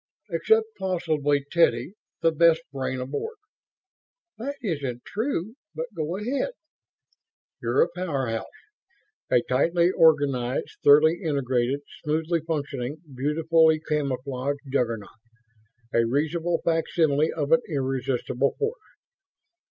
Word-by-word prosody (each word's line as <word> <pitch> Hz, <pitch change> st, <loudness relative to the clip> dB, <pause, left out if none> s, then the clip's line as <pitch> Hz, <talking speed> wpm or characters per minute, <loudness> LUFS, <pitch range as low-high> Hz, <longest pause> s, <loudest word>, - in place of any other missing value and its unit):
"Except 445 Hz, 0 st, +3 dB
possibly 155 Hz, -6 st, 0 dB
Teddy, 170 Hz, +2 st, +2 dB, 0.3 s
the 165 Hz, -, +5 dB
best 165 Hz, +1 st, +4 dB
brain 130 Hz, -1 st, -2 dB
aboard." 145 Hz, -, -4 dB, 1.0 s
"That 280 Hz, +5 st, -4 dB
isn't 140 Hz, -, -3 dB
true, 220 Hz, -, -2 dB, 0.2 s
but 245 Hz, -2 st, -5 dB
go 165 Hz, +2 st, -2 dB
ahead." 260 Hz, -, -2 dB, 1.1 s
"You're 460 Hz, -, +3 dB
a -, -, 0 dB
powerhouse. 135 Hz, -11 st, -3 dB, 0.8 s
A 120 Hz, -, +3 dB
tightly 170 Hz, +7 st, +2 dB
organized, 140 Hz, -7 st, +2 dB
thoroughly 155 Hz, +4 st, +6 dB
integrated, 135 Hz, -4 st, 0 dB, 0.2 s
smoothly 160 Hz, +2 st, 0 dB
functioning, 140 Hz, -3 st, -3 dB, 0.2 s
beautifully 160 Hz, +4 st, +3 dB
camouflaged 140 Hz, -2 st, -2 dB
Juggernaut. 115 Hz, -6 st, 0 dB, 0.9 s
A 115 Hz, -, +4 dB
reasonable 160 Hz, +6 st, 0 dB
facsimile 160 Hz, -2 st, +2 dB
of 145 Hz, -3 st, -2 dB
an 245 Hz, -, +6 dB
irresistible 135 Hz, -2 st, -1 dB
force." 450 Hz, +3 st, -2 dB
155 Hz, 100 wpm, -25 LUFS, 135-170 Hz, 1.1 s, thoroughly